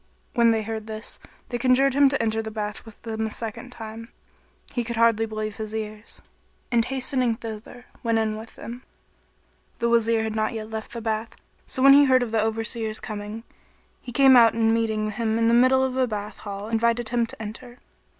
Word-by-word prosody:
When 235 -1 +4
they 225 -1 +2
heard 220 0 -5
this, 220 0 -6 0.3
they 240 - -3
conjured 260 +2 +4
him 280 0 +5
to 280 - 0
enter 225 -1 0
the 220 - -5
bath 210 0 -4
with 225 -2 -14
them 220 -1 -2
a - - -7
second 225 +3 -6
time. 225 -1 -8 0.6
He 240 - 0
could 235 +1 -4
hardly 225 -1 +3
believe 215 -1 -4
his 215 0 -5
ears 215 0 -7 0.5
and 235 -1 +3
hastening 255 -1 0
thither, 225 +2 -9 0.2
went 230 -1 +1
in 220 -1 0
with 220 +1 -10
them. 240 +2 -8 1.0
The 235 -1 0
Wazir 230 -1 +3
had 220 0 -3
not 215 0 0
yet 220 -1 -6
left 220 0 -6
the 235 - -5
bath; 220 0 -3 0.3
so 260 - -2
when 275 0 +9
he 285 +1 +7
heard 255 -2 +4
of 235 - -5
the 225 -1 +2
Overseer's 220 0 -1
coming, 210 +1 -6 0.6
he 245 - -8
came 265 +1 +6
out 230 -2 +7
and 225 -1 +3
meeting 220 -2 0
him 220 +1 -1
in 230 0 +2
the 230 - +4
middle 255 +2 +5
of 260 -1 0
the 260 0 +1
bath 210 -2 -5
hall 200 0 -6
invited 230 +1 +1
him 235 -1 +1
to - - -9
enter. 235 +3 -8
225 Hz, 205 wpm, -25 LUFS, 220-240 Hz, 1.0 s, when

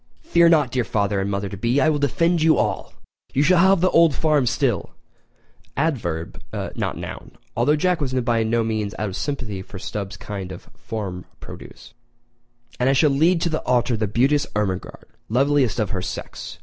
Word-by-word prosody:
Fear 170 - +4
not, 150 -6 +3
dear 125 -1 0
father 100 -2 0
and 95 +1 -1
mother 100 0 -2
to 100 - -7
be—I 120 +9 +1
will 150 -2 +1
defend 165 +5 +1
you 160 0 +4
all! - - -1 0.4
You 140 - +3
shall 180 +3 +4
have 190 0 +5
the 185 - +4
old 165 -4 +5
home 150 -5 +2
still 120 - -1 0.8
[adverb, 110 - -2 0.3
not - - -2
noun—although 125 +6 -3
Jack 180 +1 +1
was 135 -3 -1
by 120 -3 +1
no 115 +1 +1
means 110 -2 -2
out 105 -1 -2
of 95 - -6
sympathy 120 -9 -4
with 95 0 -10
Stubbs' 100 -2 -5
kind 95 -3 -6
of 90 - -11
farm 95 -5 -6
produce] - - -12 0.9
and 125 +1 +3
I - - +4
shall 145 +2 +4
lead 165 +5 +3
to 170 - +1
the 155 -1 -2
altar 125 -1 +1
the 110 -1 -1
beauteous 135 +7 +2
Ermengarde, 100 -3 -3 0.2
loveliest 135 0 +2
of 105 -4 -1
her 95 -3 -2
sex! 90 0 -7
125 Hz, 180 wpm, -22 LUFS, 105-150 Hz, 0.9 s, have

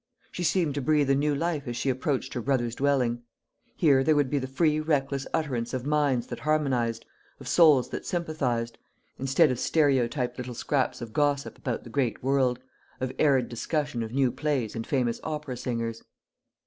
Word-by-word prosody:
She 180 - -4
seemed 165 -2 +1
to 140 - -2
breathe 145 0 +2
a - - +4
new 145 +1 +1
life 155 -2 -2
as 120 0 -3
she 135 - +1
approached 130 +1 -2
her 120 - -3
brother's 120 -2 0
dwelling. 125 -3 +1 0.5
Here 140 -5 +4
there 155 +2 +3
would 145 -3 +1
be 145 - +2
the 130 - -4
free 150 +3 +1
reckless 140 -3 0
utterance 130 -7 -1
of 125 0 -4
minds 145 -5 +1
that - - -7
harmonised, 130 -7 0 0.3
of - - -10
souls 150 -7 +5
that - - -5
sympathised: 135 -9 -2 0.4
instead 135 +3 +3
of 125 - -3
stereotyped 130 -5 +1
little 125 -1 -5
scraps 135 +1 -1
of 115 -2 -7
gossip 145 -1 0
about 125 -3 -4
the 120 - -11
great 125 -3 -1
world, 130 -2 +2 0.4
or 130 0 -2
arid 135 -5 +3
discussion 145 +2 -2
of 110 -1 -4
new 130 -1 +2
plays 130 -4 -2
and 115 0 -4
famous 125 -4 0
opera 150 -4 -4
singers. 115 -2 -3
135 Hz, 180 wpm, -27 LUFS, 120-150 Hz, 0.5 s, souls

